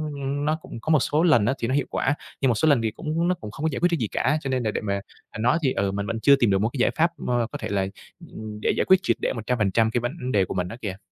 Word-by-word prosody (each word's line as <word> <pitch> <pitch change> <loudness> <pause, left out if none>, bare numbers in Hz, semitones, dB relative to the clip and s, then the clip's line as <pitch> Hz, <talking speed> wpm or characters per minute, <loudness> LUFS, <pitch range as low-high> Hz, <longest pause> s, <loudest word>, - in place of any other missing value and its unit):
n 140 +1 -3
nó 155 +1 +2
cũng 115 - -9
có - - -5
một 155 - +5
số 150 +5 +1
lần 150 -12 +4
á 135 - +2
thì 115 - -1
nó 130 - -1
hiệu 145 - +1
quả, 135 - 0 0.3
nhưng 135 - +3
một 120 - +2
số 155 - +1
lần 140 -6 +4
thì 110 -1 -1
cũng 160 +8 -2
nó 180 - +2
cũng 110 -10 -9
không 140 - -8
có - - +3
giải 135 - -3
quyết 175 - +3
cái 170 - +2
gì 115 - -1
cả, 145 +8 +1
cho 135 - -4
nên 130 -2 0
là 110 - 0
để - - -3
mà, 100 -2 -2 0.3
à, - - -10
nói 125 +7 +3
thì, 130 - +2
ừ, 100 0 0
mình 100 +1 -3
vẫn 115 +1 -3
chưa 140 +5 +6
tìm 120 -5 +2
được 95 - +3
một 110 - +1
cái - - -5
giải 120 - +3
pháp 165 +2 +3
mơ 120 -2 0
có - - -4
thể - - -5
là, 95 -1 0 0.4
ừm, 105 -1 -8
để - - +2
giải - - +2
quyết 190 - +6
triệt - - +1
để - - 0
100% 110 -2 +1
cái 120 - 0
vấn 130 +2 -4
đề 100 -4 +3
của - - -5
mình 90 -1 -1
á 110 - -8
kìa. 95 -3 -4
120 Hz, 340 wpm, -24 LUFS, 110-145 Hz, 0.4 s, chưa